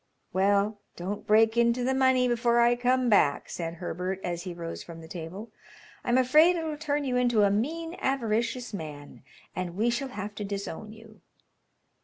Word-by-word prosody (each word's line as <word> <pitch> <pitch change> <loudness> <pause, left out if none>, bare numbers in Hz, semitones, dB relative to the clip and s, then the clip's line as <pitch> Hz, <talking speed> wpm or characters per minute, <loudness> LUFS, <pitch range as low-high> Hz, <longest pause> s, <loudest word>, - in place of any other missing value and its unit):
"Well, 200 +2 +2 0.2
don't 195 +4 -5
break 225 +2 +4
into 235 +1 +3
the 260 +2 +1
money 260 -1 +3
before 240 0 +2
I 240 +1 +5
come 250 +1 +1
back," 200 -10 +3
said 165 -1 -4
Herbert 180 +2 -4
as 175 -1 -3
he 180 0 -6
rose 165 -1 -6
from 165 -1 -10
the 160 - -11
table. 180 +6 -8 0.5
"I'm 240 +1 +2
afraid 305 +7 +5
it'll 320 -2 -3
turn 295 -1 -1
you 255 -2 0
into 240 -4 +3
a 200 - +4
mean, 325 +11 -2
avaricious 240 -2 -1
man, 150 -6 -8 0.3
and 180 0 -4
we 230 +3 +2
shall 265 +3 -2
have 210 -4 -6
to - - -1
disown 200 +1 -5
you." 220 0 -15
225 Hz, 175 wpm, -28 LUFS, 190-250 Hz, 0.5 s, I